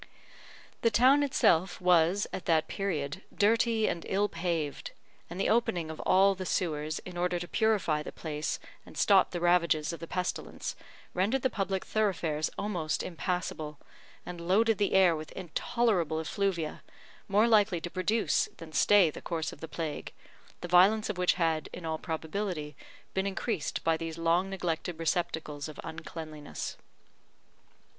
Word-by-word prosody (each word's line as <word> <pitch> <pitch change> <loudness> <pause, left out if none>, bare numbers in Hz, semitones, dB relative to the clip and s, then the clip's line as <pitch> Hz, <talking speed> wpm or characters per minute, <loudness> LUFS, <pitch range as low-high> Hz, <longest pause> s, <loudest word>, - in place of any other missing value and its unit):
The 230 - +4
town 255 +6 +5
itself 185 - +2
was, 180 +2 +3
at 185 - -5
that 160 -2 +2
period, 170 -5 -3
dirty 225 +1 +2
and 170 - -2
ill 200 +2 +2
paved; 165 -5 -3 0.4
and 175 - -7
the - - +1
opening 180 -8 +1
of 160 - -9
all 195 +1 +4
the 190 -1 -6
sewers, 155 -4 -1
in 180 -1 -8
order 180 0 0
to 175 0 -5
purify 205 -10 +1
the - - -7
place 155 -1 -3 0.3
and - - -14
stop 195 -2 +5
the 175 - -4
ravages 170 -3 +2
of 170 - -7
the 165 - -7
pestilence, 180 +1 -3 0.4
rendered 215 +8 +1
the 260 - +2
public 195 -2 -2
thoroughfares 165 -8 0
almost 175 -7 -2
impassable, 170 -3 -3 0.5
and 175 -1 -7
loaded 215 +5 +3
the 205 - +1
air 185 -3 +5
with 155 0 -7
intolerable 180 -2 0
effluvia, 170 -1 -2 0.5
more 210 +3 +4
likely 205 -6 +4
to 175 +1 -6
produce 210 +4 +1
than 160 -1 -11
stay 185 +2 +5
the - - -9
course 165 -2 -3
of - - -13
the 160 - -6
plague, 155 -2 -5 0.5
the 175 - -4
violence 200 +5 +5
of 185 - -8
which 180 - +3
had, 165 -3 0
in 175 - -8
all 160 -1 -2
probability, 160 -2 -4 0.4
been 190 +1 0
increased 195 -3 -2
by 165 -1 +2
these 165 0 -5
long 170 +3 +2
neglected 175 -3 -3
receptacles 160 -3 -2
of 155 - -10
uncleanliness. 160 -2 -7
175 Hz, 155 wpm, -30 LUFS, 160-195 Hz, 0.5 s, town